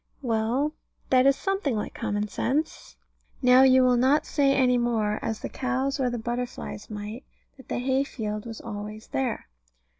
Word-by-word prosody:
Well, 240 +5 0 0.4
that 260 0 +5
is 275 - +5
something 385 - -1
like 210 - -3
common 210 -2 -2
sense. 285 +9 -2 0.5
Now 250 +1 +7
you 260 -1 +6
will 250 -1 +4
not 265 +5 +3
say 280 -2 +2
any 255 -2 +3
more, 220 -3 0
as 220 -1 -3
the - - -3
cows 265 +2 -2
or 255 -2 +1
the 240 - -3
butterflies 240 -2 -5
might, 210 +3 -6 0.3
that 265 - -15
the - - -2
hay 260 +2 +1
field 215 -4 -5
was 225 -1 -7
always 210 0 -7
there. 260 -4 -2
250 Hz, 170 wpm, -26 LUFS, 220-265 Hz, 0.5 s, Now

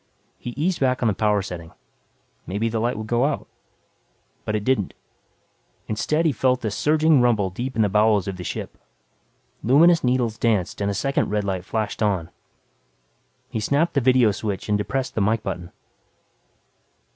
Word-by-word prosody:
He - - -6
eased 170 +5 0
back 130 -2 +1
on - - +3
the 105 - +2
power 105 0 +1
setting. 85 -4 -8 0.7
Maybe 105 +5 -1
the 115 0 -2
light 120 +1 -1
would 110 - -5
go 120 +4 +1
out. 150 - -2 1.0
But 105 - -1
it 105 - -1
didn't. 125 -5 0 0.9
Instead 150 +10 0
he 160 - +4
felt 130 -1 +1
a 110 - 0
surging 155 +4 +3
rumble 110 -6 +2
deep 125 +7 -5
in 110 - +3
the - - +3
bowels 105 -1 +3
of 95 -2 -4
the 90 - -6
ship. - - -6 0.8
Luminous 165 +8 +5
needles 125 -3 0
danced 105 -5 0
and 100 - 0
a 100 - -2
second 135 +7 0
red 105 0 0
light 95 -2 -2
flashed 110 0 -3
on. 95 -6 0 1.2
He - - -2
snapped 145 +9 +1
the 140 - +2
vidio 125 -3 +4
switch 100 -1 -4
and 105 - +3
depressed 130 +6 -2
the 110 - -1
mike 110 +2 +1
button. 90 -3 -5
110 Hz, 170 wpm, -23 LUFS, 100-130 Hz, 1.2 s, Luminous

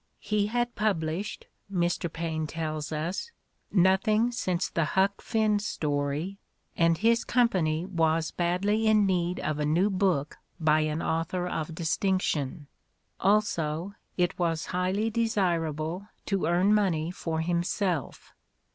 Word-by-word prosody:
"He 210 -1 0
had 240 +2 -1
published," 190 -2 -1 0.3
Mr. 175 -2 0
Paine 160 -2 -3
tells 155 -1 -4
us, 165 - -3 0.4
"nothing 210 +5 +3
since 185 -7 -1
the 165 - 0
'Huck 195 +1 +2
Finn' 215 -2 +1
story, 150 0 -2 0.4
and 165 -1 +3
his 230 +3 +3
company 180 -10 +1
was 165 -3 +1
badly 200 +6 +1
in 215 -1 +5
need 180 -2 0
of 155 -1 -2
a - - +1
new 180 +7 +2
book 185 -7 0 0.2
by 155 -1 +4
an 155 +1 -1
author 165 +2 -1
of 160 -2 -3
distinction. 165 -3 0 0.5
Also, 195 -4 +1 0.2
it 180 0 0
was 165 -2 0
highly 190 +5 0
desirable 180 -6 0 0.2
to 195 -2 0
earn 180 +4 +3
money 175 -6 +1
for 160 -3 -3
himself." 175 - -1
175 Hz, 125 wpm, -28 LUFS, 160-200 Hz, 0.5 s, in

